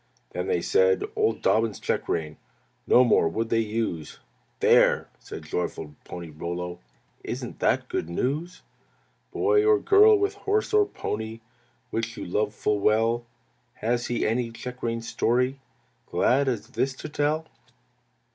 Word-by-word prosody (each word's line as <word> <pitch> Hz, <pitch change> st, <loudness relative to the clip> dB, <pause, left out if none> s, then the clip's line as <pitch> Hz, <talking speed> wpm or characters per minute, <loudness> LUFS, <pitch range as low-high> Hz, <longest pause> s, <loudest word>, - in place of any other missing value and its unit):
"Then -, -, -3 dB
they 450 Hz, -, +1 dB
said, 455 Hz, -1 st, +3 dB
old 435 Hz, 0 st, 0 dB
Dobbin's 110 Hz, -2 st, +2 dB
check -, -, -2 dB
rein 80 Hz, -2 st, -2 dB, 0.5 s
No 125 Hz, -, +7 dB
more 110 Hz, -8 st, +4 dB
would 115 Hz, +6 st, -2 dB
they 115 Hz, -, +2 dB
use! 110 Hz, -8 st, -3 dB, 0.4 s
There!" -, -, +4 dB
said -, -, -9 dB
joyful 80 Hz, -3 st, -4 dB
Pony 85 Hz, -2 st, -8 dB
Rollo, 85 Hz, +3 st, -5 dB, 0.4 s
"Isn't -, -, -5 dB
that -, -, +1 dB
good 80 Hz, -, -3 dB
news?" 150 Hz, -, -2 dB, 0.7 s
Query 425 Hz, +1 st, +3 dB
Boy -, -, +1 dB
or 430 Hz, -1 st, +6 dB
girl 420 Hz, +1 st, +6 dB
with 400 Hz, +1 st, 0 dB
horse 410 Hz, +1 st, -1 dB
or 420 Hz, -1 st, +5 dB
pony 110 Hz, -, -5 dB, 0.5 s
Which 115 Hz, +1 st, -3 dB
you -, -, -5 dB
love 105 Hz, +4 st, -1 dB
full 105 Hz, -1 st, 0 dB
well, 115 Hz, +3 st, +2 dB, 0.5 s
Has 120 Hz, +2 st, -1 dB
he 120 Hz, -, -1 dB
any 115 Hz, +2 st, 0 dB
check 125 Hz, +2 st, -8 dB
rein 115 Hz, 0 st, -2 dB
story 125 Hz, +4 st, 0 dB, 0.5 s
Glad 135 Hz, +3 st, +2 dB
as 115 Hz, -3 st, -2 dB
this 130 Hz, 0 st, -1 dB
to -, -, -7 dB
tell? 150 Hz, +2 st, 0 dB
120 Hz, 145 wpm, -26 LUFS, 105-160 Hz, 0.7 s, No